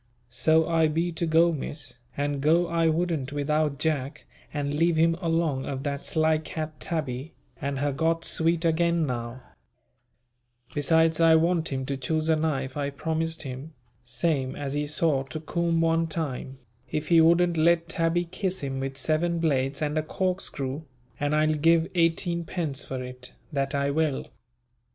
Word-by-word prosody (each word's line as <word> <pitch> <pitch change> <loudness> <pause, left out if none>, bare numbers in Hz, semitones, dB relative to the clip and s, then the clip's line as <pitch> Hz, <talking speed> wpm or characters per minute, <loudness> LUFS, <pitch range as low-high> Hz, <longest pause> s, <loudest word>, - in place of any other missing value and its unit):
So 160 +6 +3
I 165 -1 +3
be 165 +3 0
to 165 +1 -2
go 165 +2 +4
Miss; 140 -4 -4 0.2
and 145 -1 -1
go 165 +4 +4
I 165 -1 +1
wouldn't 160 -4 0
without 145 0 0
Jack 145 -2 -2 0.3
and 145 -1 -2
leave 165 +3 +2
him 165 +1 +3
along 165 -5 0
of 135 -1 -4
that 140 -1 -3
sly 160 -1 +2
cat 155 -1 -6
Tabby, 150 -4 -3 0.3
and 140 0 -2
her 145 +1 0
got 165 +3 0
sweet 165 +1 +1
again 170 0 +2
now; 120 -1 -4 1.3
besides 160 +2 +3
I 165 -1 +6
want 165 0 +2
him 130 -1 -2
to 140 0 -3
choose 155 +4 -1
a 160 - +5
knife 140 -4 -1
I 145 -1 -1
promised 160 +3 -2
him, 135 +3 -7 0.3
same 130 +1 -1
as 140 -1 -4
he 145 0 -1
saw 150 -2 +1
to 155 +4 -6
Coom 165 +1 0
one 165 0 +2
time, 140 -5 -4 0.3
if 150 0 -3
he 165 -1 +7
wouldn't 170 +1 +4
let 170 +1 +3
Tabby 170 0 +1
kiss 185 +2 -3
him 135 -1 -3
with 135 0 -4
seven 165 +3 0
blades 140 -3 0
and 150 +1 0
a - - +1
corkscrew, 155 -5 -2 0.4
and 145 +1 +1
I'll 155 0 +3
give 165 +2 +3
eighteen 170 0 +1
pence 160 -6 -3
for 130 -1 -5
it, 125 0 -9 0.2
that 140 0 -1
I 140 0 +1
will. 155 -2 0
155 Hz, 165 wpm, -26 LUFS, 140-165 Hz, 1.3 s, he